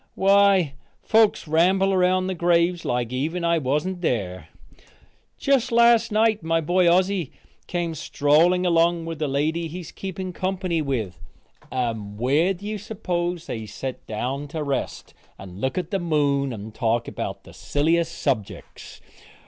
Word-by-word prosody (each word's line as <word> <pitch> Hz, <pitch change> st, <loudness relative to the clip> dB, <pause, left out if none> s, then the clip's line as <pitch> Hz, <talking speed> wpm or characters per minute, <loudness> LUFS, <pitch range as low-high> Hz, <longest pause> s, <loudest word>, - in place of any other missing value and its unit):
Why 195 Hz, -5 st, +4 dB, 0.3 s
folks 220 Hz, -6 st, +3 dB
ramble 190 Hz, +5 st, +3 dB
around 185 Hz, 0 st, +2 dB
the 190 Hz, -, -2 dB
graves 170 Hz, 0 st, +2 dB
like 120 Hz, 0 st, -2 dB
even 160 Hz, +7 st, -2 dB
I 170 Hz, -1 st, +2 dB
wasn't 150 Hz, +7 st, -1 dB
there. 95 Hz, -, -2 dB, 0.9 s
Just 270 Hz, -3 st, +1 dB
last 235 Hz, -1 st, +4 dB
night 215 Hz, 0 st, +2 dB
my 165 Hz, 0 st, +1 dB
boy 175 Hz, +2 st, +3 dB
Ossy 185 Hz, -3 st, +1 dB, 0.4 s
came 175 Hz, -2 st, -2 dB
strolling 160 Hz, +5 st, +2 dB
along 170 Hz, -1 st, +2 dB
with 165 Hz, -2 st, -6 dB
the 155 Hz, -, 0 dB
lady 155 Hz, +5 st, -1 dB
he 175 Hz, +3 st, -7 dB
is 165 Hz, -, -10 dB
keeping 190 Hz, -1 st, -6 dB
company 185 Hz, -3 st, -1 dB
with, 115 Hz, -, -3 dB, 0.5 s
and 110 Hz, -5 st, -3 dB
where 150 Hz, -, +2 dB
do 195 Hz, +4 st, -12 dB
you 210 Hz, 0 st, -3 dB
s'pose 180 Hz, -5 st, -3 dB
they 110 Hz, -9 st, -5 dB
set 130 Hz, +4 st, -7 dB
down 130 Hz, +6 st, -3 dB
to 155 Hz, +1 st, -4 dB
rest, 140 Hz, -2 st, -4 dB, 0.2 s
and 95 Hz, 0 st, -10 dB
look 130 Hz, +4 st, -1 dB
at 180 Hz, -2 st, -3 dB
the 195 Hz, -, 0 dB
moon 145 Hz, -5 st, +1 dB
and 110 Hz, -1 st, -8 dB
talk 115 Hz, +1 st, 0 dB
about -, -, -5 dB
the -, -, -14 dB
silliest 165 Hz, +3 st, 0 dB
subjecks? 125 Hz, -9 st, -4 dB
165 Hz, 150 wpm, -23 LUFS, 140-185 Hz, 0.9 s, Why